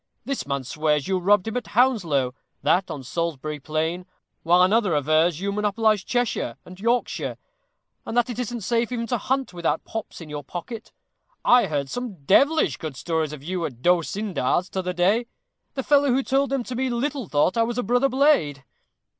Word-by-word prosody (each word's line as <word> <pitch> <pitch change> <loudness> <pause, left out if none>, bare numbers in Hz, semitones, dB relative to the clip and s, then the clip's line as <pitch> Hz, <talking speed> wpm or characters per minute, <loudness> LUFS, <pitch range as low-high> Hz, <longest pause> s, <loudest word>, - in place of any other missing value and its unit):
This 275 - -3
man 140 -1 -2
swears 150 +2 0
you 190 -1 +1
robbed 200 +2 +3
him 220 - -3
at 245 - -4
Hounslow; 170 - +2 0.3
that 185 +1 +2
on 140 - -6
Salisbury 155 0 -3
Plain; 160 +5 -2 0.3
while 175 +2 +5
another 200 -1 +3
avers 155 +3 +2
you 200 +1 -1
monopolize 210 0 +1
Cheshire 240 - -1
and 185 +1 -12
Yorkshire, 235 +4 -1 0.7
and 235 - -4
that 240 - +3
it 245 -1 -5
isn't 240 -1 -3
safe 235 +3 0
even 235 -2 -2
to 245 0 -1
hunt 265 -1 -1
without 170 -1 -1
pops 225 -1 -6
in 165 - -9
your 150 -1 -6
pocket. 220 - -7 0.5
I 245 0 +6
heard 145 -3 -2
some 215 - -6
devilish 290 - +4
good 155 -5 -6
stories 160 +1 -1
of 150 -3 -9
you 180 +2 -3
at 125 -6 -6
D'Osyndar's 180 0 +1
t'other 180 -1 -3
day; 200 +7 +2 0.5
the 265 - -2
fellow 285 +1 +4
who 260 +2 +2
told 275 +2 +1
them 270 -2 -1
to 250 - -6
me 260 +1 0
little 260 0 -2
thought 150 +5 +2
I 230 - +2
was 230 +1 -1
a 245 - 0
brother 245 +5 +2
blade." 255 - +2
195 Hz, 185 wpm, -24 LUFS, 155-245 Hz, 0.7 s, I